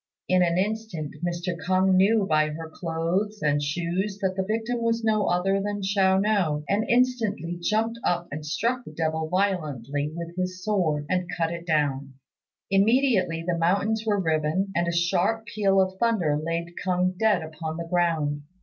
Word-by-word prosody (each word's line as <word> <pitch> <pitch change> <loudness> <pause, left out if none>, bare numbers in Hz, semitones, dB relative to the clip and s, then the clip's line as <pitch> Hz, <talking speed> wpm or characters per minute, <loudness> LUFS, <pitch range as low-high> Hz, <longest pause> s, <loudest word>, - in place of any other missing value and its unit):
In 185 0 +3
an 170 -1 +2
instant 195 -6 -2 0.5
K'ung 185 +1 +3
knew 200 +3 +4
by 155 -3 +2
her 160 +2 -6
clothes 180 +6 -2
and 145 -1 +2
shoes 175 +6 -2
that 190 -2 -1
the 190 - 0
victim 225 +4 -2
was 230 0 0
no 215 -2 +2
other 195 +3 +1
than 205 0 -3
Chiao 190 -1 +3
no, 190 -8 +1
and 210 +3 0
instantly 230 -9 +1
jumping 225 +5 0
up 175 0 0
he 150 - -4
struck 235 +11 -1
the 155 - -11
devil 160 0 -1
violently 150 - -1
with 170 0 -6
his 185 0 -3
sword, 170 -8 0
and 180 -1 -1
cut 165 -1 0
it 170 +1 -8
down. 140 -4 0 0.6
Immediately 195 -5 +3
the 170 -1 0
mountains 200 +6 +1
were 210 -2 +1
riven, 160 +3 0
and 170 0 +1
a - - +1
sharp 175 +6 +1
peal 195 -3 +1
of 190 0 0
thunder 205 -11 +2
laid 165 +3 -3
K'ung 185 0 +1
dead 210 -6 +3
upon 160 0 -6
the 170 - -4
ground. 165 -4 0
180 Hz, 170 wpm, -25 LUFS, 165-205 Hz, 0.6 s, knew